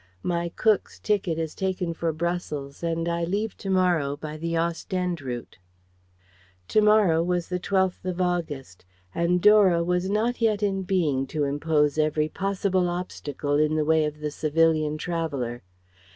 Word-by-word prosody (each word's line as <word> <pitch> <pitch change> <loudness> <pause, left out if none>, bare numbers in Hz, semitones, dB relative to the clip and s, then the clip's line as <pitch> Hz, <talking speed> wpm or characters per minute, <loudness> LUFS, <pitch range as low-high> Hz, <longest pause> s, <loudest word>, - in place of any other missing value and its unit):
My 170 -1 -1
Cook's 215 -3 +1
ticket 195 -6 0
is 160 -1 -3
taken 185 -3 -2
for 165 0 -1
Brussels 155 -4 -4
and 165 0 -1
I 170 0 -1
leave 200 +5 -2
to 195 - -6
morrow 175 -7 +2
by 155 0 -6
the 165 +2 -3
Ostende 170 +1 -2
route." 120 -6 -6 1.1
"To 215 - +4
morrow" 210 -6 +4
was 175 0 -1
the 180 0 -1
12th 190 0 0
of 185 -1 -3
August, 160 - -2 0.3
and 170 +1 +1
Dora 200 -5 +6
was 180 +2 0
not 230 +4 0
yet 215 -2 +2
in 195 -1 0
being 165 -9 0
to 150 +1 -1
interpose 150 +1 +1
every 155 0 +1
possible 190 -1 0
obstacle 150 -5 -2
in 155 0 +2
the 155 -1 +1
way 160 0 +3
of 150 0 -5
the 150 -1 -2
civilian 155 0 +1
traveller. 145 -8 -3
170 Hz, 155 wpm, -25 LUFS, 155-185 Hz, 1.1 s, Dora